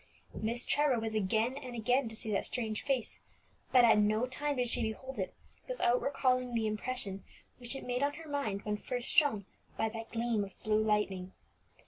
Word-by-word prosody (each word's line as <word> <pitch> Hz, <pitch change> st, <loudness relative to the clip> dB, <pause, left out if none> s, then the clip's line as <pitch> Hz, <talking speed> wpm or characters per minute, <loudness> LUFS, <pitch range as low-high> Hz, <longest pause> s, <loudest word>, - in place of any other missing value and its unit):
Miss 235 Hz, +3 st, -1 dB
Trevor 290 Hz, -4 st, +3 dB
was 225 Hz, 0 st, -3 dB
again 220 Hz, +5 st, +1 dB
and 255 Hz, -4 st, -7 dB
again 245 Hz, +2 st, +2 dB
to 225 Hz, -, -9 dB
see 220 Hz, 0 st, -4 dB
that 200 Hz, -, +1 dB
strange 220 Hz, -3 st, -2 dB
face, 270 Hz, -5 st, -1 dB, 0.5 s
but 250 Hz, -2 st, +7 dB
at 225 Hz, -2 st, +6 dB
no 215 Hz, +3 st, +3 dB
time 285 Hz, +3 st, -1 dB
did 250 Hz, -1 st, 0 dB
she 240 Hz, -, +2 dB
behold 230 Hz, +3 st, -4 dB
it 190 Hz, -, -2 dB, 0.4 s
without 250 Hz, -, +2 dB
recalling 255 Hz, -3 st, +1 dB
the 225 Hz, -1 st, +1 dB
impression 215 Hz, -2 st, -2 dB, 0.4 s
which 245 Hz, +1 st, -3 dB
it 270 Hz, -, -6 dB
made 250 Hz, +1 st, -1 dB
on 285 Hz, 0 st, +2 dB
her 325 Hz, 0 st, -10 dB
mind 225 Hz, -9 st, -2 dB
when 210 Hz, 0 st, -1 dB
first 245 Hz, +2 st, -3 dB
shown 280 Hz, -, +4 dB, 0.3 s
by 220 Hz, -, +1 dB
that 225 Hz, 0 st, -7 dB
gleam 230 Hz, -2 st, 0 dB
of 195 Hz, -, -10 dB
blue 215 Hz, 0 st, +3 dB
lightning. 200 Hz, -4 st, 0 dB
235 Hz, 190 wpm, -33 LUFS, 215-255 Hz, 0.5 s, but